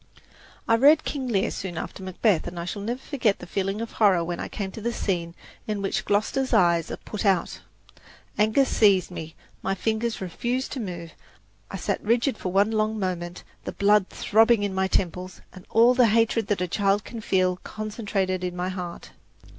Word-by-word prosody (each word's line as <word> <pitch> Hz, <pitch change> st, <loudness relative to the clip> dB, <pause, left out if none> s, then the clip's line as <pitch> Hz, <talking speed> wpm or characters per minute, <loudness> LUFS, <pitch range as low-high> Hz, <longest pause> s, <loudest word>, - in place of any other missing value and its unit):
I 230 Hz, -, +4 dB
read 295 Hz, +5 st, +6 dB
"King 270 Hz, -3 st, -3 dB
Lear" 200 Hz, -5 st, +1 dB
soon 180 Hz, -3 st, -5 dB
after 190 Hz, -, -6 dB
"Macbeth," 185 Hz, -1 st, +1 dB
and 175 Hz, 0 st, -6 dB
I 170 Hz, -, -4 dB
shall 200 Hz, +3 st, -4 dB
never 235 Hz, +4 st, -2 dB
forget 250 Hz, -7 st, 0 dB
the -, -, -10 dB
feeling 195 Hz, +3 st, -2 dB
of 230 Hz, -, -5 dB
horror 195 Hz, -6 st, +3 dB
when 175 Hz, +1 st, -4 dB
I -, -, -4 dB
came 195 Hz, -2 st, -5 dB
to 220 Hz, -, -8 dB
the 235 Hz, +2 st, -1 dB
scene 175 Hz, -6 st, -2 dB, 0.3 s
in 210 Hz, -1 st, -2 dB
which 195 Hz, -, -1 dB
Gloster's 235 Hz, +6 st, +1 dB
eyes 170 Hz, -2 st, +3 dB
are -, -, -4 dB
put 210 Hz, -, -6 dB
out. 195 Hz, -4 st, +1 dB, 0.7 s
Anger 215 Hz, +6 st, +3 dB
seized 195 Hz, -7 st, +3 dB
me, 160 Hz, -2 st, -7 dB, 0.3 s
my 195 Hz, -, -1 dB
fingers 220 Hz, +3 st, -1 dB
refused 240 Hz, +8 st, -3 dB
to 270 Hz, -, -4 dB
move, 175 Hz, -6 st, -6 dB, 0.6 s
I -, -, -5 dB
sat -, -, -2 dB
rigid 240 Hz, +4 st, +2 dB
for 185 Hz, -, -4 dB
one 200 Hz, +3 st, +3 dB
long 215 Hz, 0 st, 0 dB
moment, 180 Hz, -3 st, -3 dB, 0.2 s
the -, -, -4 dB
blood 205 Hz, -1 st, +3 dB
throbbing 225 Hz, 0 st, +3 dB
in 200 Hz, -1 st, -1 dB
my 190 Hz, 0 st, +1 dB
temples, 185 Hz, 0 st, -2 dB
and 185 Hz, -, -13 dB
all 235 Hz, +2 st, +5 dB
the 250 Hz, -2 st, +5 dB
hatred 225 Hz, 0 st, +2 dB
that 205 Hz, -3 st, 0 dB
a 180 Hz, -, 0 dB
child 200 Hz, +2 st, +1 dB
can 230 Hz, -2 st, -8 dB
feel 185 Hz, -3 st, +1 dB
concentrated 200 Hz, -3 st, -3 dB
in 180 Hz, -1 st, -3 dB
my 180 Hz, +1 st, -2 dB
heart. 180 Hz, -2 st, -6 dB
200 Hz, 195 wpm, -25 LUFS, 185-225 Hz, 0.7 s, read